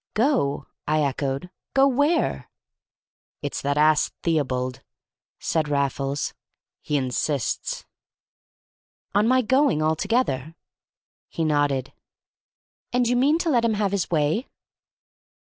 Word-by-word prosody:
"Go?" 180 - +1 0.2
I 155 0 +2
echoed. 140 +4 -2 0.2
"Go 270 0 +6
where?" 285 +5 +1 0.9
"It's - - -3
that 140 +1 0
ass 155 0 +4
Theobald," 130 -5 -1 0.6
said 155 -2 -1
Raffles. 140 0 -1 0.5
"He 150 - -1
insists." 130 0 -2 1.3
"On 205 +2 +3
my 255 +1 +4
going 260 - +3
altogether?" 160 - 0 0.7
He 165 - -2
nodded. 145 -3 +1 1.0
"And 245 -1 +2
you 245 - +2
mean 280 +6 +4
to 325 - +2
let 240 -4 +3
him 225 -2 +2
have 205 -2 0
his 200 -4 -1
way?" 160 - +1
155 Hz, 110 wpm, -24 LUFS, -, 1.3 s, Go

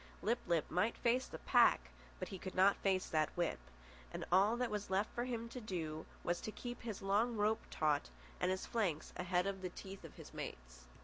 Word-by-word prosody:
Lip 235 +3 +2
lip 170 -3 +2
might 210 +7 +2
face 245 +2 +2
the - - -7
pack, 60 0 +4 0.3
but - - -4
he 190 - -6
could 185 - -6
not 195 +2 +6
face 190 -2 +2
that 155 -1 +2
whip, 175 -2 +1 0.5
and - - -4
all 200 +6 +5
that 245 -2 0
was 210 -2 -2
left 195 +3 0
him 240 -1 -2
to 250 +1 -6
do 160 -7 -4 0.2
was 175 0 0
to 215 - -4
keep 245 +2 -6
his 220 -4 -5
long 215 +4 +2
rope 210 +1 +2
taut 150 -1 +1 0.3
and 180 - +2
his 185 0 -1
flanks 190 -10 -1
ahead 180 0 +1
of 195 -1 -2
the 185 - -2
teeth 195 +2 -9
of - - -10
his - - -11
mates. - - -7
195 Hz, 205 wpm, -38 LUFS, 175-220 Hz, 0.5 s, not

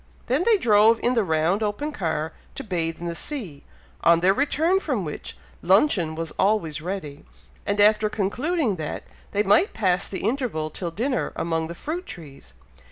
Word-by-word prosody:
They 260 +4 +1
then 425 +4 +3
drove 220 - +5
in 245 - +3
the 230 -3 +2
round 165 +4 +1
open 220 +9 -2
car, 160 - -2 0.2
to 275 - -5
bathe 165 -6 -2
in 175 - -6
the 170 - -2
sea, 180 - -5 0.4
on 170 0 +5
their 190 +2 +4
return 315 - +2
from 255 - -2
which, 150 - -7 0.2
luncheon 185 - +3
was 165 0 -4
always 170 -7 +1
ready, 155 -5 -5 0.4
and 200 +1 0
after 210 +1 +5
concluding 220 - -1
that, 155 -2 -5 0.3
they 205 +1 +1
might 210 - +3
pass 185 -3 +1
the 190 - -5
interval 215 - -1
till 175 +2 -3
dinner 245 +10 -2
among 165 -1 -1
the 170 - -7
fruit 340 - -5
trees. 140 - -9
200 Hz, 170 wpm, -24 LUFS, 165-245 Hz, 0.4 s, drove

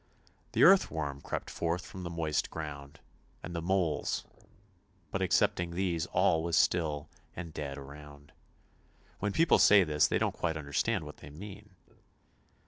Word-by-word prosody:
The - - +4
earthworm 80 - +4
crept - - -5
forth 85 +1 -2
from 95 - -9
the 85 - -5
moist 80 -3 -1
ground, 75 -2 -7 0.4
and 85 +1 -6
the 85 - -2
moles 85 -4 0 0.4
— 95 -3 -37
but 95 - -2
excepting 90 -1 +2
these 90 -3 -1
all 80 - +2
was 85 0 -1
still 75 -4 +1 0.3
and 85 -3 -7
dead 70 -2 -5
around; 70 +1 -12 0.9
when 105 0 -1
people 165 +9 +4
say 100 -2 +7
this 75 -2 +3
they - - +1
don't - - +1
quite 80 -2 -2
under 70 -2 -8
stand - - +1
what - - -10
they 70 - -12
mean. 100 +5 -11
85 Hz, 155 wpm, -31 LUFS, 75-90 Hz, 0.9 s, say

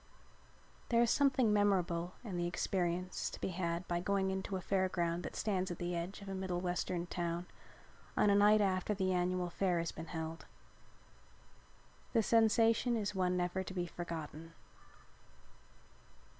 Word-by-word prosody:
There 235 0 +4
is 235 - +2
something 260 -6 +3
memorable 180 -4 +1
in 205 -6 -5
the 175 0 0
experience 180 0 -1
to - - -9
be - - -2
had 170 -1 -2
by 175 0 0
going 190 +1 +1
into 190 +1 -3
a - - -1
fair 190 0 +1
ground 170 -1 -1
that - - -6
stands 190 -3 0
at 175 - -4
the 175 0 -2
edge 180 +4 -4
of - - -10
a 195 - -4
Middle 190 -2 -2
Western 175 -1 -2
town 175 0 -3 0.7
on 205 - +5
a - - +5
night 210 +1 +6
after 190 +1 +1
the 190 -1 +1
annual 180 0 0
fair 180 -2 +1
has 165 -1 -1
been 165 +1 -8
held. 160 0 -5 1.7
The 225 -2 +4
sensation 230 +2 +4
is 205 -2 -2
one 180 -1 +1
never 180 +1 0
to 190 - -6
be 175 -1 -1
forgotten. 165 -2 -6
185 Hz, 160 wpm, -35 LUFS, 175-200 Hz, 1.7 s, night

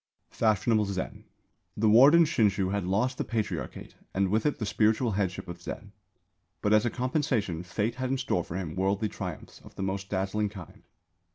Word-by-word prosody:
FASHIONABLE 110 0 +2
ZEN. 95 -2 -5 0.5
The 110 +1 +2
warden 135 +10 +7
Shinshū 100 - +1
had 100 -2 -1
lost 110 +8 0
the - - +1
Patriarchate 110 -3 -4 0.2
and 95 0 +2
with 110 +6 +2
it 150 - 0
the 110 - -3
spiritual 110 +3 +2
headship 95 -2 -2
of 85 0 -8
Zen. - - -7 0.7
But 105 - +3
as 110 +2 +4
a - - +2
compensation 125 - -1
Fate 105 +6 -2
had 130 - -1
in 135 - 0
store 125 -9 0
for 80 - -8
him 90 -5 -4
worldly 100 +3 0
triumphs 90 -6 -7
of - - -15
the - - -4
most 95 0 -3
dazzling 100 +2 -1
kind. 95 -5 -11
105 Hz, 180 wpm, -28 LUFS, 95-115 Hz, 0.7 s, warden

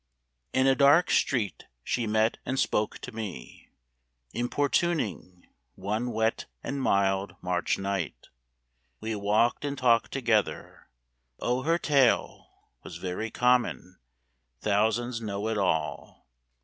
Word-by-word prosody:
In 130 0 +2
a 135 - +5
dark 145 +5 +5
street 115 -8 0 0.2
she 120 - -1
met 110 +1 +1
and 130 +1 -2
spoke 105 -5 0
to 125 - -7
me, 105 - -8 0.6
Importuning, 120 - -1 0.3
one 110 +5 -2
wet 110 0 0 0.2
and 140 0 -3
mild 100 -3 +1
March 90 -1 -1
night. 95 -4 -4 0.7
We 110 0 -3
walked 105 +5 +1
and 140 -1 -3
talked 120 -3 +3
together. 115 -6 -1 0.5
O 125 +1 0
her 165 +5 +2
tale 140 -7 +2 0.3
Was - - -9
very 95 +4 -4
common; 120 -7 +1 0.6
thousands 115 - 0
know 105 -1 -3
it 110 - -1
all! 90 -5 -2
110 Hz, 115 wpm, -28 LUFS, 100-130 Hz, 0.7 s, a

